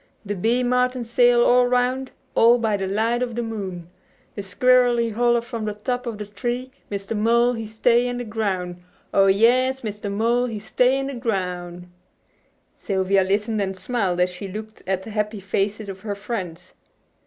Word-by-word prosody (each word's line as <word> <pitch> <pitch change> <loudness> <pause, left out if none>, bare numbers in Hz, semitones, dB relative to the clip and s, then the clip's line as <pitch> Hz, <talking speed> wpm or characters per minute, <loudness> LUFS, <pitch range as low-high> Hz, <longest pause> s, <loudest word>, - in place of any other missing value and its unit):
De 205 - -2
bee 230 +6 +1
martin 250 0 +1
sail 240 +1 +4
all 250 0 +5
'roun', 250 +1 +1 0.3
All 235 +2 +6
by 220 -3 0
de 195 -1 -2
light 225 +5 0
of 240 -2 -2
de 240 - -1
moon. 190 -7 -5 0.5
De 205 - -4
squirrel 245 +5 +3
he 230 -1 0
holler 240 +1 +2
from 230 -2 -5
de 210 -1 -3
top 245 +4 -3
of 225 -3 -4
de 210 - -5
tree; 240 +5 -4 0.2
Mr. 200 +2 -4
Mole 235 +3 +3
he 225 -2 -5
stay 235 +3 +2
in 245 0 -3
de 245 - -3
groun', 190 -6 -3 0.3
Oh, 195 0 +5
yes! 250 +6 +3
Mr. 210 -2 -5
Mole 235 +4 +1
he 225 -3 -4
stay 250 +5 +2
in 270 - -2
de 275 - -4
groun' 180 -6 -4 0.4
'" - - -42
Sylvia 190 0 +2
listened 210 +3 0
and 190 -1 -3
smiled 190 -3 -1
as 180 0 +2
she 180 +3 -7
looked 215 +3 -8
at 190 0 -1
the 220 - -9
happy 210 0 -2
faces 200 +2 -2
of 195 -1 -7
her 205 -1 -4
friends. 195 -5 -6
220 Hz, 190 wpm, -23 LUFS, 195-245 Hz, 0.5 s, All